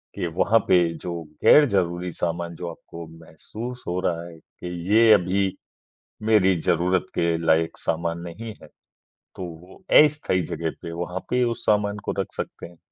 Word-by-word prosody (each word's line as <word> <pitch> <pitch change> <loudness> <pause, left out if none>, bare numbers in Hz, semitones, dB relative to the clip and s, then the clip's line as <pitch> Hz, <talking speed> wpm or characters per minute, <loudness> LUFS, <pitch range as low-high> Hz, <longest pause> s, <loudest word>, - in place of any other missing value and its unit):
कि - - -2
वहाँ 100 +7 +2
पे 90 -1 +5 0.2
जो 85 -1 -4 0.2
गैर 150 - +8
ज़रूरी 90 -2 -1
सामान 85 0 -3
जो 85 +1 -5
आपको 85 0 -10
महसूस 85 +10 -9
हो 90 +1 -1
रहा 85 -2 -1
है 85 -1 -12
कि 90 - -12 0.3
ये 115 0 +7
अभी 95 0 +2 0.7
मेरी 105 -4 +4
ज़रूरत 90 0 +1
के 85 -1 +1
लायक 80 0 +2
सामान 85 +1 -2
नहीं 100 +7 -7
है - - -11 0.7
तो 95 - -6
वो 85 +1 -10 0.3
अस्थाई 150 -11 +1
जगह 85 -1 -3
पे 85 - -6
वहाँ 90 +2 -4
पे 125 0 +2
उस 120 -1 -2
सामान 105 -1 +2
को - - -1
रख 95 - -3
सकते - - -5
हैं 85 0 -18
90 Hz, 165 wpm, -24 LUFS, 85-100 Hz, 0.7 s, गैर